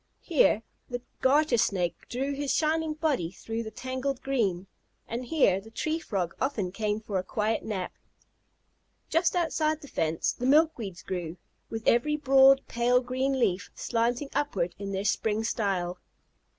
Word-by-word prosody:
Here 280 Hz, -, +3 dB, 0.3 s
the 245 Hz, -1 st, -4 dB, 0.2 s
Garter 275 Hz, -2 st, +4 dB
Snake 185 Hz, -6 st, +1 dB
drew 270 Hz, +3 st, -2 dB
his 280 Hz, 0 st, -2 dB
shining 315 Hz, 0 st, +1 dB
body 300 Hz, -, 0 dB
through 225 Hz, +5 st, -5 dB
the 220 Hz, -, -5 dB
tangled 260 Hz, +3 st, -3 dB
green, 205 Hz, -10 st, 0 dB, 0.4 s
and 235 Hz, +2 st, -4 dB
here 235 Hz, -, +3 dB
the 220 Hz, -, -13 dB
Tree 310 Hz, +8 st, -2 dB
Frog 190 Hz, -, -2 dB
often 225 Hz, -9 st, -1 dB
came 210 Hz, +1 st, -1 dB
for 205 Hz, -3 st, -2 dB
a -, -, -3 dB
quiet 215 Hz, +3 st, -1 dB
nap. 195 Hz, -4 st, -4 dB, 1.2 s
Just 330 Hz, +3 st, +2 dB
outside 315 Hz, -3 st, +1 dB
the 285 Hz, -, -10 dB
fence 160 Hz, -, 0 dB
the 250 Hz, -, -3 dB
milkweeds 265 Hz, -, +2 dB
grew, 175 Hz, -2 st, -4 dB, 0.3 s
with 225 Hz, 0 st, -5 dB
every 300 Hz, +6 st, +4 dB
broad, 270 Hz, -1 st, +6 dB
pale 240 Hz, +1 st, +3 dB
green 260 Hz, +2 st, -1 dB
leaf 185 Hz, -6 st, +1 dB
slanting 240 Hz, +4 st, -1 dB
upward 190 Hz, -12 st, -1 dB
in 200 Hz, -1 st, -4 dB
their 195 Hz, +1 st, -2 dB
spring 215 Hz, +2 st, +1 dB
style. 190 Hz, -6 st, -1 dB
235 Hz, 150 wpm, -28 LUFS, 195-275 Hz, 1.2 s, broad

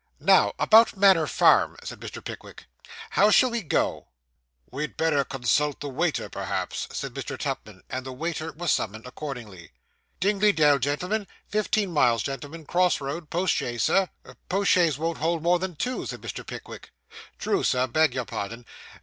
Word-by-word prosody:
'Now, -, -, +4 dB
about 220 Hz, -1 st, +5 dB
Manor 190 Hz, -5 st, +5 dB
Farm,' -, -, +4 dB
said -, -, -7 dB
Mr. -, -, -8 dB
Pickwick. -, -, -9 dB, 0.5 s
'How 205 Hz, -, +4 dB
shall 250 Hz, +4 st, +5 dB
we 235 Hz, -1 st, -1 dB
go?' 170 Hz, -, -1 dB, 0.6 s
'We 135 Hz, -, -5 dB
had 150 Hz, -, -4 dB
better 155 Hz, -3 st, +2 dB
consult 135 Hz, +3 st, 0 dB
the 145 Hz, -, -5 dB
waiter, 155 Hz, +4 st, -1 dB
perhaps,' -, -, -4 dB
said -, -, -5 dB
Mr. -, -, -5 dB
Tupman; -, -, -5 dB
and 130 Hz, 0 st, -4 dB
the 130 Hz, -, -7 dB
waiter 160 Hz, +4 st, -4 dB
was 170 Hz, +2 st, -2 dB
summoned 110 Hz, +2 st, -2 dB
accordingly. 120 Hz, -, -8 dB, 0.5 s
'Dingley 205 Hz, +2 st, +3 dB
Dell, 150 Hz, -4 st, +4 dB
gentlemen 180 Hz, -, -1 dB, 0.2 s
fifteen 210 Hz, -2 st, 0 dB
miles, 120 Hz, -7 st, +3 dB
gentlemen 145 Hz, +4 st, -6 dB
cross 180 Hz, +3 st, +2 dB
road 150 Hz, +3 st, -5 dB
post 180 Hz, +2 st, +1 dB
chaise, 120 Hz, -2 st, -2 dB
sir?' 195 Hz, -2 st, +3 dB, 0.4 s
'Post 195 Hz, +2 st, +2 dB
chaise 165 Hz, -6 st, +3 dB
won't 165 Hz, +2 st, -2 dB
hold 165 Hz, +1 st, 0 dB
more 175 Hz, +1 st, +3 dB
than 185 Hz, -1 st, -4 dB
two,' 250 Hz, +11 st, -3 dB
said -, -, -6 dB
Mr. -, -, -6 dB
Pickwick. -, -, -9 dB, 0.5 s
'True, 395 Hz, -, 0 dB
sir 130 Hz, -1 st, +2 dB
beg 145 Hz, +2 st, +2 dB
your 125 Hz, -2 st, -2 dB
pardon, 115 Hz, +4 st, -6 dB, 0.3 s
sir. -, -, -18 dB
155 Hz, 170 wpm, -26 LUFS, 135-185 Hz, 0.6 s, about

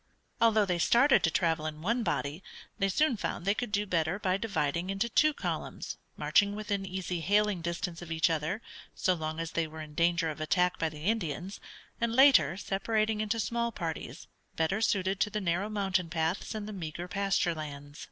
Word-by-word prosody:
Although 220 Hz, -2 st, +5 dB
they 180 Hz, -2 st, -1 dB
started 265 Hz, -, +5 dB
to 165 Hz, -, +3 dB
travel 160 Hz, -2 st, +1 dB
in 155 Hz, 0 st, -7 dB
one 230 Hz, +6 st, +1 dB
body 165 Hz, -5 st, -2 dB, 0.4 s
they 195 Hz, -1 st, +2 dB
soon 270 Hz, +4 st, +2 dB
found 175 Hz, -, -3 dB
they 200 Hz, -, +3 dB
could 240 Hz, 0 st, -4 dB
do 205 Hz, 0 st, +1 dB
better 170 Hz, -1 st, 0 dB
by 185 Hz, -3 st, 0 dB
dividing 180 Hz, -5 st, -1 dB
into 195 Hz, +4 st, 0 dB
two 305 Hz, +6 st, +4 dB
columns, -, -, -4 dB, 0.2 s
marching 205 Hz, -1 st, +3 dB
within 205 Hz, -2 st, -3 dB
easy 180 Hz, -1 st, -3 dB
hailing 205 Hz, +1 st, +2 dB
distance 170 Hz, 0 st, -3 dB
of 170 Hz, -1 st, -8 dB
each 160 Hz, 0 st, +3 dB
other, 165 Hz, +6 st, -1 dB, 0.3 s
so 185 Hz, -, +2 dB
long 160 Hz, -1 st, -4 dB
as 165 Hz, -1 st, -3 dB
they 165 Hz, -1 st, 0 dB
were 160 Hz, +1 st, -10 dB
in 150 Hz, -1 st, -11 dB
danger 170 Hz, 0 st, +2 dB
of 155 Hz, -, -8 dB
attack 180 Hz, +3 st, +1 dB
by 165 Hz, -, +1 dB
the 150 Hz, -1 st, -10 dB
Indians, 190 Hz, -3 st, -2 dB, 0.4 s
and 235 Hz, 0 st, 0 dB
later 215 Hz, -, +6 dB
separating 215 Hz, +2 st, 0 dB
into 215 Hz, +2 st, -1 dB
small 235 Hz, +2 st, -1 dB
parties, 165 Hz, -7 st, -5 dB, 0.3 s
better 175 Hz, +7 st, 0 dB
suited 195 Hz, -3 st, +1 dB
to 210 Hz, -, +2 dB
the 210 Hz, -, -2 dB
narrow 190 Hz, +2 st, 0 dB
mountain 190 Hz, -4 st, 0 dB
paths 165 Hz, +6 st, -1 dB
and 210 Hz, -1 st, -4 dB
the 215 Hz, -, -6 dB
meagre 175 Hz, -1 st, -5 dB
pasture 195 Hz, -3 st, +1 dB
lands. 145 Hz, -2 st, -8 dB
185 Hz, 190 wpm, -30 LUFS, 165-210 Hz, 0.4 s, later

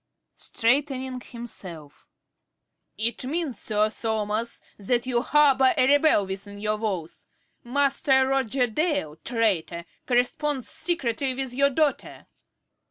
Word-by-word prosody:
~Carey~ -, -, -55 dB
(straightening 260 Hz, +1 st, 0 dB
himself). 185 Hz, -, -10 dB, 0.9 s
It 225 Hz, +3 st, -1 dB
means, 295 Hz, 0 st, -2 dB
Sir 215 Hz, 0 st, 0 dB
Thomas, 220 Hz, +1 st, -2 dB, 0.2 s
that 240 Hz, +5 st, 0 dB
you 245 Hz, -2 st, 0 dB
harbour 270 Hz, -2 st, +4 dB
a 255 Hz, -, +4 dB
rebel 285 Hz, -7 st, +4 dB
within 200 Hz, +1 st, -7 dB
your 215 Hz, +1 st, -1 dB
walls. 190 Hz, -7 st, -4 dB, 0.4 s
Master 270 Hz, +1 st, +2 dB
Roger 265 Hz, -1 st, +1 dB
Dale, 245 Hz, -, -1 dB
traitor, 190 Hz, -8 st, -1 dB, 0.2 s
corresponds 260 Hz, +2 st, 0 dB
secretly 270 Hz, -6 st, -1 dB
with 265 Hz, -1 st, -3 dB
your 280 Hz, +2 st, +4 dB
daughter. 290 Hz, +1 st, -1 dB
245 Hz, 110 wpm, -25 LUFS, 215-270 Hz, 0.9 s, harbour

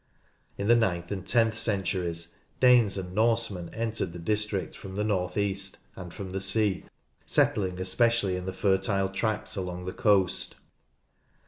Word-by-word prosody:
In 100 Hz, -, -2 dB
the 120 Hz, -, +6 dB
ninth 90 Hz, -7 st, 0 dB
and 95 Hz, -3 st, -5 dB
tenth 115 Hz, -2 st, +3 dB
centuries 90 Hz, -5 st, -1 dB, 0.2 s
Danes 120 Hz, -6 st, +5 dB
and 90 Hz, -1 st, -5 dB
Norsemen 110 Hz, -5 st, +1 dB
entered 110 Hz, -6 st, -2 dB
the -, -, -7 dB
district 105 Hz, +2 st, -1 dB
from 95 Hz, -1 st, -9 dB
the 105 Hz, -, -1 dB
north 90 Hz, -3 st, -1 dB
east, 100 Hz, -1 st, 0 dB, 0.2 s
and 90 Hz, -2 st, -8 dB
from 95 Hz, -1 st, -7 dB
the 95 Hz, +1 st, -3 dB
sea, 100 Hz, 0 st, +1 dB, 0.4 s
settling 95 Hz, -3 st, +1 dB
especially 100 Hz, +1 st, +1 dB
in 90 Hz, 0 st, -5 dB
the -, -, -1 dB
fertile 95 Hz, 0 st, +1 dB
tracts 110 Hz, +2 st, -2 dB
along 90 Hz, -2 st, -4 dB
the 95 Hz, -, -4 dB
coast. 100 Hz, -5 st, +2 dB
95 Hz, 150 wpm, -28 LUFS, 90-110 Hz, 0.4 s, the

